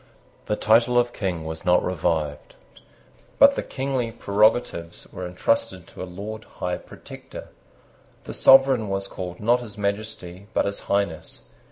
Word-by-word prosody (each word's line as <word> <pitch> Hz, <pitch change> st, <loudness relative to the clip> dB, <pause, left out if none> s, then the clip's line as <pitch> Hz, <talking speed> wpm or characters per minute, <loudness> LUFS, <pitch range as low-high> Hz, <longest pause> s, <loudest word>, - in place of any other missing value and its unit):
The 105 Hz, -, +1 dB
title 115 Hz, +3 st, +3 dB
of 120 Hz, 0 st, +2 dB
King 90 Hz, -5 st, -3 dB
was 80 Hz, 0 st, -6 dB
not 90 Hz, 0 st, +3 dB
revived; 80 Hz, -4 st, -2 dB, 0.8 s
but 280 Hz, 0 st, +8 dB
the -, -, -1 dB
kingly 130 Hz, -3 st, -2 dB
prerogatives 105 Hz, -5 st, +1 dB
were 90 Hz, -, -5 dB
intrusted 95 Hz, 0 st, -1 dB
to -, -, -10 dB
a -, -, -3 dB
Lord 105 Hz, +4 st, -7 dB
High 90 Hz, 0 st, -4 dB
Protector. -, -, -11 dB, 0.7 s
The -, -, -7 dB
sovereign 135 Hz, -5 st, +5 dB
was 95 Hz, 0 st, -2 dB
called 90 Hz, -2 st, -7 dB
not 120 Hz, +4 st, +3 dB
His 110 Hz, -4 st, -9 dB
Majesty, 100 Hz, -2 st, -4 dB
but -, -, +2 dB
His 100 Hz, 0 st, -2 dB
Highness. 90 Hz, -10 st, -2 dB
100 Hz, 145 wpm, -24 LUFS, 90-115 Hz, 0.8 s, but